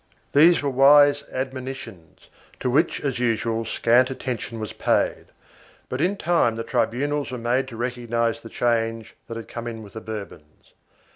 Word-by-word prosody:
1 145 - +6
These 170 -2 +5
were 140 - +1
wise 145 +2 +6
admonitions 130 - -7 0.3
to 125 - -1
which 155 +6 +2
as 135 -4 -2
usual 115 -1 0
scant 120 +3 +3
attention 125 -3 -5
was 110 -1 -5
paid, - - 0 0.6
but 130 - -3
in 190 +4 +1
time 165 -10 +2
the 115 - -4
tribunals 140 +6 -1
were 130 - -5
made 125 +3 0
to 115 -3 -9
recognize 120 -1 -1
the 115 - -10
change 115 -2 -1
which 115 - -6
had 115 - -8
come 120 0 -6
in 115 -1 -6
with 100 - -13
the 110 - -7
Bourbons. 100 -9 -9
120 Hz, 165 wpm, -24 LUFS, 115-135 Hz, 0.6 s, 1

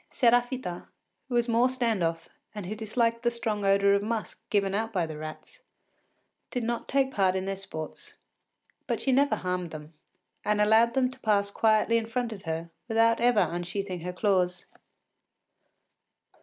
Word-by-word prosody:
Séraphita, 245 -6 +1 0.4
who 245 - -2
was 240 0 +2
more 235 +2 +3
stand 235 -6 0
off 165 0 -2 0.3
and 205 -3 -5
who 195 - -4
disliked 230 +2 0
the 240 - +2
strong 225 -3 -3
odour 200 0 +4
of 200 - +2
musk 215 -2 -4
given 195 -2 +1
out 220 +2 -1
by 180 -5 0
the 160 -1 -7
rats, 155 0 -9 0.9
did 245 -3 -3
not 235 +1 -2
take 270 -1 +2
part 190 -2 +2
in 190 0 -2
their 195 0 -2
sports, 195 - -8 0.7
but - - -1
she 270 - +1
never 280 +2 +3
harmed 180 -1 -3
them, 155 0 -10 0.5
and 210 0 +1
allowed 220 +3 +4
them 260 -1 +3
to 260 - -14
pass 200 -3 +1
quietly 220 +2 +3
in 225 - -6
front 235 0 -2
of 195 -4 -11
her 165 +1 -4 0.2
without 230 0 +3
ever 240 -2 +4
unsheathing 175 +2 -3
her 180 +2 -4
claws. 180 -2 0
210 Hz, 170 wpm, -28 LUFS, 185-235 Hz, 0.9 s, odour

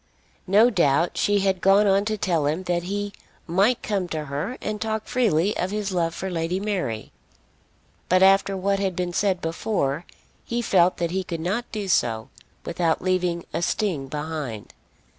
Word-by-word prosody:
No 215 +6 +5
doubt 170 - +2
she 205 -1 +2
had 190 -2 +1
gone 195 +2 +5
on 195 0 +3
to 215 0 -1
tell 170 -7 +1
him 160 +5 -1
that 175 -1 0
he 205 +1 -3 0.3
might 200 +8 +2
come 195 -4 -1
to 155 -3 -4
her 150 - -4
and 210 0 -4
talk 220 -1 -2
freely 210 -6 +1
of 180 - -1
his 210 0 -2
love 170 -2 0
for 190 0 -4
Lady 170 +2 -1
Mary, 185 - -3 1.0
but 185 +1 +5
after 195 0 +4
what 195 +1 0
had 190 -2 -1
been 180 0 -2
said 190 -1 +1
before, 165 -2 -2 0.4
he 235 - -2
felt 185 -6 +3
that 170 -1 -1
he 190 +1 -1
could 175 -3 -5
not 200 +9 -2
do 210 -3 -4
so 115 -7 +1 0.4
without 170 -1 0
leaving 180 -2 0
a - - -1
sting 175 -7 -1
behind. 150 -7 -5
185 Hz, 175 wpm, -24 LUFS, 165-200 Hz, 1.0 s, No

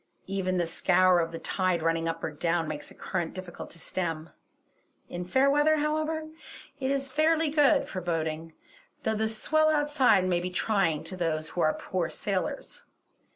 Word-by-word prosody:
Even 185 -1 -1
the 175 - +1
scour 180 +2 +3
of 165 -1 -1
the 165 - -5
tide 185 -2 0
running 165 0 +1
up 165 0 -3
or - - -2
down 165 +2 0
makes 150 -1 -6
a - - -15
current 175 -4 -3
difficult 185 -2 -7
to - - -9
stem. 165 -2 -4 0.8
In 175 0 -4
fair 265 +9 +3
weather, 295 +2 +4
however, 310 +1 -1 0.6
it 265 -1 -1
is 275 0 0
fairly 315 +2 +2
good 295 -1 +4
for 185 - -5
boating; 160 -1 -3 0.5
though 220 - +1
the 220 0 0
swell 310 +8 +2
outside 290 -10 +3
may 175 -1 +2
be 180 +1 -3
trying 180 -4 +1
to 185 - -7
those 160 -3 -1
who 175 - -3
are 155 - +3
poor 180 -3 -2
sailors. 190 -4 -3
185 Hz, 175 wpm, -28 LUFS, 165-275 Hz, 0.8 s, weather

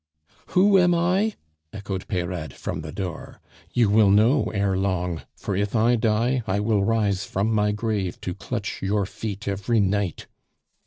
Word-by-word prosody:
"Who 195 +1 +6
am 175 -1 +4
I?" 185 +6 +1 0.4
echoed 100 -2 -5
Peyrade 85 -5 -3
from 80 - -5
the 75 0 -7
door. 90 -2 -6 0.3
"You 115 -4 +2
will 105 -1 +5
know 110 +8 +4
ere 100 -2 0
long; 90 -3 -1
for 100 - -4
if 100 +3 -1
I 115 +2 +4
die, 115 +3 +1
I 95 +2 0
will 105 -1 +1
rise 100 -3 +1
from 100 +3 -1
my 105 -1 +2
grave 105 -4 -2
to - - -3
clutch - - -5
your 100 +1 0
feet 105 +1 -6
every 100 +4 0
night!" 100 -3 0
105 Hz, 160 wpm, -24 LUFS, 95-115 Hz, 0.4 s, Who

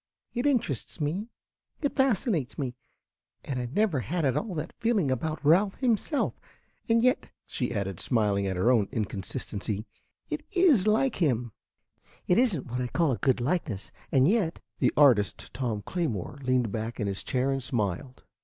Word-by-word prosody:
It 245 +3 0
interests 230 - 0
me, 165 +9 -1 0.5
it 285 - -1
fascinates 220 - +1
me; 130 -3 -2 0.7
and 130 -3 -2
I 125 - -2
never 175 - +1
had 160 +5 -1
at 130 - +2
all 205 -5 -2
that 150 0 -4
feeling 210 - +2
about 155 +4 -2
Ralph 190 +6 +4
himself. 255 +4 +1 0.6
And 230 0 +4
yet," 255 0 +2 0.2
she 125 - -3
added, 100 -5 -3
smiling 105 -5 +1
at 95 - -1
her 100 +8 +4
own 110 -6 +3
inconsistency, 105 0 -3 0.4
"it 305 0 -4
is 320 - +4
like 225 +4 +2
him. 125 - +1 0.7
It 180 - +4
is 240 -8 +3
n't 130 - -7
what 125 +1 -3
I 125 - -1
call 165 +3 +1
a 120 - -2
good 130 -2 +2
likeness, 125 - -2 0.2
and 135 0 +5
yet 190 -5 +1
" - - -47
The - - +3
artist, 115 -9 +4
Tom 115 -6 -2
Claymore, 145 - -3
leaned 130 -4 +1
back 110 +2 -4
in 105 - 0
his 100 -1 -2
chair 130 +1 0
and 135 0 -1
smiled. 125 +1 -2
135 Hz, 170 wpm, -28 LUFS, -, 0.7 s, and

